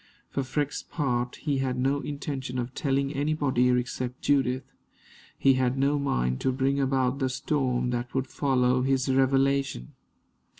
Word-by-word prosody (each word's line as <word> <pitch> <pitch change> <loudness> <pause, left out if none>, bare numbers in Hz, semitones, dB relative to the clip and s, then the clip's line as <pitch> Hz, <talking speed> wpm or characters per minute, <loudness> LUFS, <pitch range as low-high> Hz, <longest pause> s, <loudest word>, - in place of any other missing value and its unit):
For 140 - -1
Freke's 145 +2 -2
part, 125 -5 -2
he 145 -3 -1
had 130 -1 -1
no 135 +3 +1
intention 140 -3 -4
of 125 +1 -3
telling 140 0 0
anybody 140 -4 +1
except 125 0 -2
Judith. 135 -2 +2 0.7
He 135 - +5
had 130 0 +1
no 140 +2 +2
mind 65 - 0
to 130 - +2
bring 135 +2 0
about 135 -1 +1
the 130 -2 +1
storm 130 -2 0
that 120 +1 -3
would 130 0 +1
follow 130 -2 +1
his 130 0 +1
revelation. 135 - +1
135 Hz, 145 wpm, -27 LUFS, 125-140 Hz, 0.7 s, He